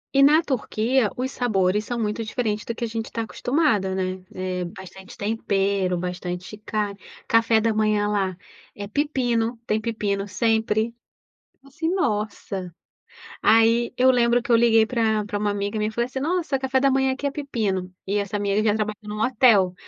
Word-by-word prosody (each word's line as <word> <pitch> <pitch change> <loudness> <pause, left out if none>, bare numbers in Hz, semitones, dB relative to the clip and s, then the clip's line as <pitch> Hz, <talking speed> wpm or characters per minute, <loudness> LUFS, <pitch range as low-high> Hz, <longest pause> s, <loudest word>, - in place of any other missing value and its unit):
E 275 - +6
na 305 +4 +6
Turquia, 245 -3 0
os 260 +1 -2
sabores 210 -3 +1
são 240 - -3
muito 215 +1 -2
diferentes 215 -2 -2
do 230 - -4
que 235 - -5
a - - -3
gente 225 0 -5
tá 230 - -2
acostumada, 220 - 0
né. 185 0 -2
É, 185 -1 -3
bastante 190 +2 -11
tempero, 200 -3 0
bastante 180 +2 -5
carne. 210 -2 -3 0.3
Café 230 -1 +4
da 225 0 +1
manhã 215 -1 +1
lá 195 -3 -1 0.4
é 205 0 -6
pepino. 240 -3 0
Tem 215 +1 0
pepino 205 -3 -2
sempre. 220 +2 +1 0.7
Assim, 315 +4 -3
nossa! 205 - -2 0.7
Aí, 230 +2 +4
eu 260 +1 +5
lembro 240 0 +3
que 240 0 -2
eu - - +7
liguei 225 -1 +4
pra 220 -3 +1
pra 205 0 -4
uma 205 0 0
amiga 205 +1 -2
minha 215 0 0
e - - -4
falei 235 +2 0
assim: 265 +1 -5
"Nossa, 325 -2 0
café 265 0 0
da 275 0 +3
manhã 265 0 +2
aqui 280 +2 -4
é - - +1
pepino." 205 -11 -2
E 205 +2 0
essa 200 0 -2
minha 200 -1 0
amiga, 215 +1 +2
ela 210 - +1
trabalhava 215 -1 -2
num 210 0 -5
hotel. 220 -7 +4
220 Hz, 180 wpm, -23 LUFS, 200-240 Hz, 0.7 s, eu